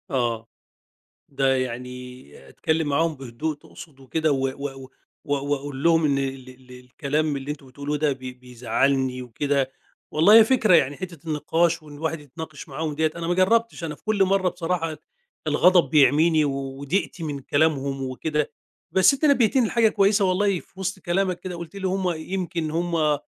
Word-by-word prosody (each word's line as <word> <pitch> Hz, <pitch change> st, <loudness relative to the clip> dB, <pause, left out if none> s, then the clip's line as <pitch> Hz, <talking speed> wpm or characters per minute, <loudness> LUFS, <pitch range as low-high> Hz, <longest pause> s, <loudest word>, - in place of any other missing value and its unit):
آه، 120 Hz, -5 st, -1 dB, 0.8 s
ده 135 Hz, -1 st, +2 dB
يعني 125 Hz, 0 st, -6 dB
أتكلّم 160 Hz, -1 st, -1 dB
معاهم 160 Hz, +3 st, +1 dB
بهدوء 135 Hz, +4 st, -4 dB
تقصد 145 Hz, 0 st, -14 dB
وكده، 155 Hz, +4 st, -1 dB
و 135 Hz, -1 st, +1 dB
و 140 Hz, +2 st, -4 dB
و 135 Hz, -1 st, -11 dB, 0.4 s
و 145 Hz, -, -1 dB, 0.2 s
واقول 140 Hz, -1 st, -3 dB
لهم 165 Hz, -1 st, +4 dB
إن 140 Hz, -2 st, +2 dB
ال 135 Hz, -1 st, -4 dB
ال 130 Hz, 0 st, -16 dB
الكلام 140 Hz, +4 st, -2 dB
اللي 135 Hz, +2 st, -5 dB
أنتم 140 Hz, -2 st, -9 dB
بتقولوا 140 Hz, +3 st, -4 dB
ده 150 Hz, 0 st, +1 dB
بي 130 Hz, -1 st, -6 dB
بيزعلني 125 Hz, +1 st, -1 dB
وكده، 135 Hz, +2 st, -1 dB, 0.4 s
والله 165 Hz, +7 st, +5 dB
هي -, -, +9 dB
فكرة 220 Hz, -5 st, +4 dB
يعني 140 Hz, -3 st, +2 dB
حتة 170 Hz, -4 st, -8 dB
النقاش 165 Hz, +2 st, +1 dB
وإن 150 Hz, -1 st, -12 dB
الواحد 160 Hz, +2 st, -3 dB
يتناقش 150 Hz, +1 st, -9 dB
معاهم 150 Hz, +2 st, -3 dB
دِيّة، 155 Hz, +1 st, +1 dB
أنا 170 Hz, -1 st, -4 dB
ما 175 Hz, -, +2 dB
جرّبتش 210 Hz, +2 st, +2 dB
أنا 155 Hz, -2 st, -4 dB
في -, -, -29 dB
كل 215 Hz, -2 st, +2 dB
مرّة 190 Hz, -1 st, +2 dB
بصراحة 165 Hz, -1 st, -2 dB
اد 155 Hz, -, -8 dB, 0.5 s
الغضب 180 Hz, -1 st, +4 dB
بيعميني 155 Hz, +2 st, +4 dB
و 145 Hz, -, 0 dB, 0.3 s
وضيقتي 170 Hz, +4 st, -2 dB
من 145 Hz, -3 st, -3 dB
كلامهم 140 Hz, -1 st, 0 dB
وكده، 150 Hz, +4 st, -2 dB, 0.4 s
بس 190 Hz, +6 st, +5 dB
أنت 275 Hz, +3 st, 0 dB
نبهتني 255 Hz, -4 st, +4 dB
لحاجة 225 Hz, 0 st, +3 dB
كويسة 200 Hz, 0 st, +3 dB
والله 190 Hz, 0 st, +1 dB
في 185 Hz, -, -19 dB
وِسط 190 Hz, 0 st, -3 dB
كلامك 185 Hz, 0 st, -1 dB
كده 185 Hz, -1 st, -6 dB
وقُلت 170 Hz, +2 st, -9 dB
لي 195 Hz, -1 st, -2 dB
هُم 185 Hz, -1 st, 0 dB
يمكن 170 Hz, -1 st, -3 dB
هُم 165 Hz, -3 st, +1 dB
155 Hz, 175 wpm, -24 LUFS, 135-175 Hz, 0.8 s, هي